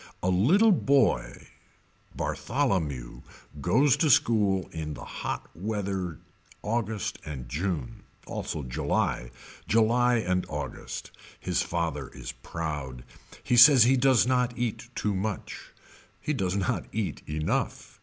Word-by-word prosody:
A 90 - +2
little 175 - +5
boy 140 - +1 0.7
Bartholomew 85 - -2 0.4
goes 135 - +4
to 160 - +2
school 105 -7 +3
in 75 -2 -5
the - - -9
hot - - -5
weather 95 -3 -3 0.5
August 110 -2 -2
and 65 -5 -7
June. 75 -1 -3 0.2
Also 75 - -4
July. - - -1 0.4
July 120 +2 +3
and 90 -5 0
August. - - -6 0.3
His - - 0
father 80 -5 -2
is - - -6
proud. 75 -6 -5 0.4
He 125 - +1
says 130 0 +9
he 130 +3 +4
does 130 -2 +4
not 125 -1 +1
eat 120 0 -3
too 105 - -1
much. 100 +2 -4 0.5
He 150 - -2
does 95 -8 -1
not 105 +4 -1
eat 110 -3 -3
enough. 75 +1 -2
100 Hz, 120 wpm, -27 LUFS, 80-125 Hz, 0.7 s, says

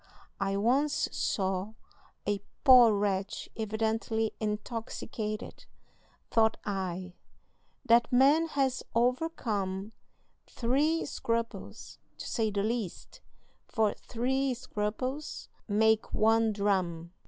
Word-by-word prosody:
I 195 0 0
once 265 +8 +2
saw 190 +2 -1 0.5
a 205 -1 0 0.2
poor 250 -4 +8
wretch 200 -1 -1
evidently 220 0 -1
intoxicated; 215 +1 -4 0.7
thought 220 -1 +3
I, 185 -2 -3 0.7
'That 235 0 +4
man 280 +6 +5
has 270 -4 0
overcome 225 - 0 0.6
three 290 +7 +1
scruples, 230 -4 -4 0.2
to - - -7
say 225 -2 0
the 200 -1 -1
least, 220 -4 -4 0.5
for 220 -3 +1
three 260 +2 -1
scruples 255 +6 -4 0.2
make 220 +1 +2
one 225 +1 +3
dram.' 185 -5 -1
220 Hz, 90 wpm, -30 LUFS, 205-250 Hz, 0.7 s, poor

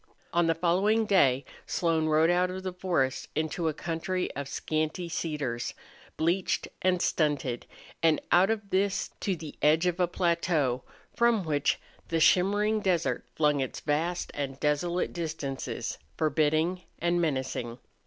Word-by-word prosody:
On 170 -1 +3
the 165 - +2
following 195 +7 +2
day 140 -10 +3 0.2
Slone 165 -2 +1
rode 155 +2 +4
out 180 +1 +2
of 185 +1 -5
the 185 -1 -3
forest 170 -8 0
into 160 +2 -1
a 155 - +1
country 170 +3 -2
of 140 -1 -5
scanty 155 +4 -2
cedars, 150 -7 -3 0.4
bleached 175 +4 +1
and 185 -1 +2
stunted, 145 -6 0 0.3
and 160 -2 +4
out 185 +3 +5
of 215 -3 -2
this 195 +1 +1
to 195 - 0
the 155 -3 -8
edge 155 +3 +4
of 180 0 0
a 180 - +3
plateau, 170 -7 +1 0.3
from 235 -4 +3
which 150 -3 +1 0.3
the 165 - 0
shimmering 205 +6 +4
desert 165 - 0
flung 150 -2 +3
its 130 -2 -3
vast 165 +4 -1
and 135 -2 -4
desolate 170 +4 0
distances, 155 -5 -4 0.2
forbidding 155 +4 +1 0.2
and 175 +1 +1
menacing. 130 -6 -2
165 Hz, 145 wpm, -28 LUFS, 150-180 Hz, 0.4 s, out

